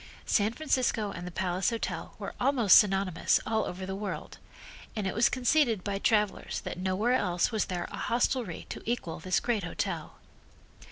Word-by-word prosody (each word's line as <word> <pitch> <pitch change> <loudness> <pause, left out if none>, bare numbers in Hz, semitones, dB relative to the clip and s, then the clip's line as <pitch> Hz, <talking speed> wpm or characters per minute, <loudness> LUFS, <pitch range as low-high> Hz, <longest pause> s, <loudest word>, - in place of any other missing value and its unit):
San 210 0 +2
Francisco 245 -6 0
and 175 -2 -7
the - - -6
Palace 180 +1 0
Hotel 230 -1 -4
were - - -6
almost 245 -6 +6
synonymous 195 -4 +3
all 220 0 0
over 185 +1 -5
the 190 0 -4
world, 200 -1 -5 0.6
and 210 -3 -2
it 190 - -1
was 230 +3 +4
conceded 245 -5 +2
by 200 -1 -2
travelers 210 -1 +1
that - - -6
nowhere 190 +6 +1
else 180 -6 +1
was 220 -3 0
there 175 -2 -3
a - - -6
hostelry 235 -6 -1
to - - -6
equal 235 -9 -2
this 185 +3 +1
great 230 -5 -1
hotel. 170 - -3
205 Hz, 170 wpm, -29 LUFS, 185-235 Hz, 0.6 s, almost